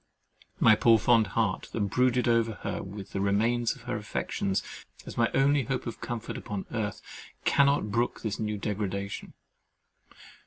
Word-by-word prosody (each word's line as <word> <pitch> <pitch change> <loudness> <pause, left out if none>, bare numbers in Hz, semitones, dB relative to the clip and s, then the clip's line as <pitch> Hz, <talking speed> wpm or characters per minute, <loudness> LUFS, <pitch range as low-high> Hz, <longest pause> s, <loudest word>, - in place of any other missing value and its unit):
My 115 - +7
poor 115 +1 +5
fond 115 0 +4
heart, 110 -5 0
that - - -2
brooded 125 +4 +2
over 115 -1 +2
her - - -2
and 100 +1 -7
the 100 0 -4
remains 115 +4 +1
of 130 - -15
her 125 +1 -3
affections 100 -2 -2 0.4
as - - -8
my 115 0 +2
only 140 0 +3
hope 130 +2 -2
of 115 - -6
comfort 115 -2 -4
upon 100 -4 -5
earth, 110 -3 -3 0.4
cannot 140 -6 +3
brook 120 +3 0
this 110 -3 -2
new 105 -1 -2
degradation. 100 -1 -3
110 Hz, 155 wpm, -28 LUFS, 100-120 Hz, 0.4 s, My